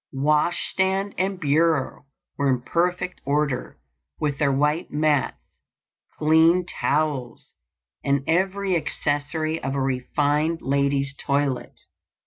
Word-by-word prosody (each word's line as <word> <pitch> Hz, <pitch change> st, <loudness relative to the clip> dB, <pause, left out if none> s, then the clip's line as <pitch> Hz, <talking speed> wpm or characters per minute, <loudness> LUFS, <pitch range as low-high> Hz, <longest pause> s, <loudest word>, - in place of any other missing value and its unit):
Wash 150 Hz, +5 st, +1 dB
stand 195 Hz, +1 st, 0 dB
and 190 Hz, 0 st, -1 dB
bureau 155 Hz, -2 st, +1 dB, 0.3 s
were 140 Hz, -1 st, +1 dB
in 130 Hz, -2 st, +1 dB
perfect 180 Hz, +4 st, -1 dB
order, 140 Hz, -2 st, -1 dB, 0.4 s
with 145 Hz, -2 st, -1 dB
their 140 Hz, -2 st, +3 dB
white 150 Hz, +4 st, 0 dB
mats, 150 Hz, -1 st, +1 dB, 0.8 s
clean 160 Hz, +3 st, +4 dB
towels, 145 Hz, -7 st, -2 dB, 0.5 s
and 140 Hz, -1 st, +1 dB
every 190 Hz, +3 st, +1 dB
accessory 155 Hz, 0 st, -1 dB
of 135 Hz, +1 st, -3 dB
a -, -, 0 dB
refined 145 Hz, +5 st, 0 dB
lady's 140 Hz, 0 st, +1 dB
toilet. 140 Hz, -2 st, -2 dB
150 Hz, 110 wpm, -24 LUFS, 140-165 Hz, 0.8 s, clean